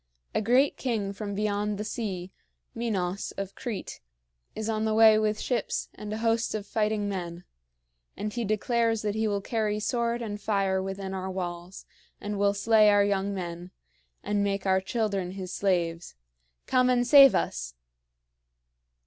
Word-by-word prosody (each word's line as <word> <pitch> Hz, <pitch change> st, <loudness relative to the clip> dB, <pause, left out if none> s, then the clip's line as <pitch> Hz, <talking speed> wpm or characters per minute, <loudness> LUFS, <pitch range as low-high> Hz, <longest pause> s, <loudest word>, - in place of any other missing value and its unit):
A -, -, +1 dB
great 250 Hz, +6 st, +3 dB
king 215 Hz, -6 st, -2 dB
from 200 Hz, 0 st, -5 dB
beyond 210 Hz, 0 st, -1 dB
the 210 Hz, -, -3 dB
sea, 190 Hz, -5 st, -4 dB, 0.4 s
Minos 200 Hz, -5 st, -2 dB
of 195 Hz, -1 st, -4 dB
Crete, 230 Hz, -5 st, -6 dB, 0.6 s
is 220 Hz, 0 st, -4 dB
on 220 Hz, -1 st, -1 dB
the 220 Hz, 0 st, +1 dB
way 220 Hz, -1 st, +7 dB
with 215 Hz, 0 st, 0 dB
ships 245 Hz, -, -2 dB
and 210 Hz, 0 st, -8 dB
a 215 Hz, -, -2 dB
host 225 Hz, 0 st, 0 dB
of 210 Hz, -2 st, -4 dB
fighting 210 Hz, -1 st, 0 dB
men; 175 Hz, -3 st, -5 dB, 0.7 s
and 210 Hz, 0 st, -4 dB
he 240 Hz, -, -2 dB
declares 225 Hz, +1 st, 0 dB
that 210 Hz, -1 st, 0 dB
he 220 Hz, +1 st, 0 dB
will 200 Hz, -1 st, -1 dB
carry 210 Hz, -1 st, -1 dB
sword 235 Hz, +1 st, -1 dB
and 210 Hz, -2 st, -5 dB
fire 195 Hz, -2 st, +1 dB
within 195 Hz, 0 st, -5 dB
our 190 Hz, 0 st, -4 dB
walls, 180 Hz, -1 st, -6 dB, 0.3 s
and 205 Hz, -1 st, -4 dB
will 200 Hz, 0 st, +2 dB
slay 215 Hz, +1 st, +5 dB
our 205 Hz, 0 st, +5 dB
young 200 Hz, 0 st, 0 dB
men 175 Hz, -2 st, -5 dB, 0.5 s
and 205 Hz, -1 st, 0 dB
make 200 Hz, -1 st, -1 dB
our 190 Hz, 0 st, +3 dB
children 195 Hz, -3 st, -2 dB
his 185 Hz, -1 st, -6 dB
slaves. 170 Hz, -, -1 dB, 0.5 s
Come 255 Hz, 0 st, +3 dB
and 245 Hz, -1 st, +3 dB
save 275 Hz, +1 st, +8 dB
us!" -, -, -2 dB
205 Hz, 160 wpm, -27 LUFS, 190-220 Hz, 0.7 s, save